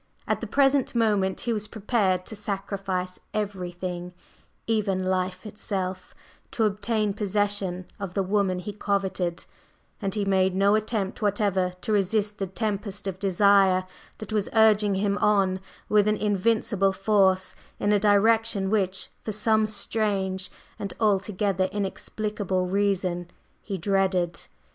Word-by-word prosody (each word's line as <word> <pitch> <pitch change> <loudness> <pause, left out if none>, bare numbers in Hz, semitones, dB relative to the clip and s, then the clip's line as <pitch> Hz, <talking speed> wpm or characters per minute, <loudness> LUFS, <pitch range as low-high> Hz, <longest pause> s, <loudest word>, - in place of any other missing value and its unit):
At - - 0
the - - -4
present 275 -2 +2
moment 205 -5 +1
he 235 - -1
was 210 -1 -2
prepared 200 -5 0
to 220 - -7
sacrifice 195 -2 -3 0.2
everything, 180 -3 -4 0.5
even 200 -4 0
life 185 0 -1
itself, 190 -3 -4 0.3
to 225 - 0
obtain 210 0 0
possession 200 -3 -1
of 195 -3 -5
the 195 - +1
woman 195 -1 +1
he 185 +3 -5
coveted, 190 -4 -1 0.6
and 195 0 -2
he 205 -2 0
made 190 -1 +2
no 200 +1 +4
attempt 215 -2 -1
whatever 200 -3 +1
to - - -2
resist 210 +1 +1
the 195 - -1
tempest 200 0 -3
of 190 -1 -4
desire 195 -1 +4 0.3
that 215 0 -7
was 210 -2 0
urging 215 -2 +4
him 200 +1 0
on 195 -3 +2 0.3
with 210 -1 +4
an 210 0 +2
invincible 205 -1 +1
force 190 -2 +2 0.3
in 205 - +1
a 205 - +4
direction 210 -1 +3
which, 195 -3 0
for 215 - -3
some 215 +1 +2
strange 200 -3 -1 0.3
and 200 - -5
altogether 200 -2 +1
inexplicable 200 -1 -2
reason, 185 -2 0 0.3
he 195 -2 -4
dreaded. 185 -2 0
200 Hz, 135 wpm, -26 LUFS, 190-210 Hz, 0.6 s, no